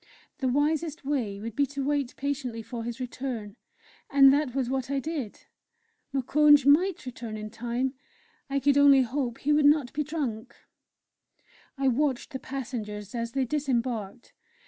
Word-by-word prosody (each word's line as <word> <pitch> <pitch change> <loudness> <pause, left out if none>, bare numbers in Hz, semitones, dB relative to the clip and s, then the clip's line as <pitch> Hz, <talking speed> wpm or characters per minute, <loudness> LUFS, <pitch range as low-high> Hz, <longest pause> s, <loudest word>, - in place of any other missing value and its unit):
The 265 - 0
wisest 300 +3 0
way 240 -9 -1
would 225 +1 -6
be 280 +1 +2
to 280 +1 -4
wait 285 -3 -1
patiently 265 -5 -3
for 235 0 -6
his 235 +1 -5
return, 245 -4 -5 0.5
and 275 -1 +7
that 285 -3 0
was 265 -3 0
what 265 0 -2
I 280 -1 0
did. 280 -6 -5 0.7
Moukounj 290 +1 +4
might 330 +5 +3
return 235 -3 -6
in 215 0 -7
time 240 +3 -2 0.6
I 275 0 0
could 285 +1 +3
only 280 -2 +7
hope 250 -1 -2
he 295 +2 +1
would 295 0 +3
not 290 -4 +4
be 300 - -1
drunk! 275 -8 -4 1.2
I 270 0 +1
watched 260 0 0
the 265 - -5
passengers 215 -7 -6
as 235 -1 -3
they 270 -1 +1
disembarked. 245 -6 -2
265 Hz, 155 wpm, -27 LUFS, 235-285 Hz, 1.2 s, and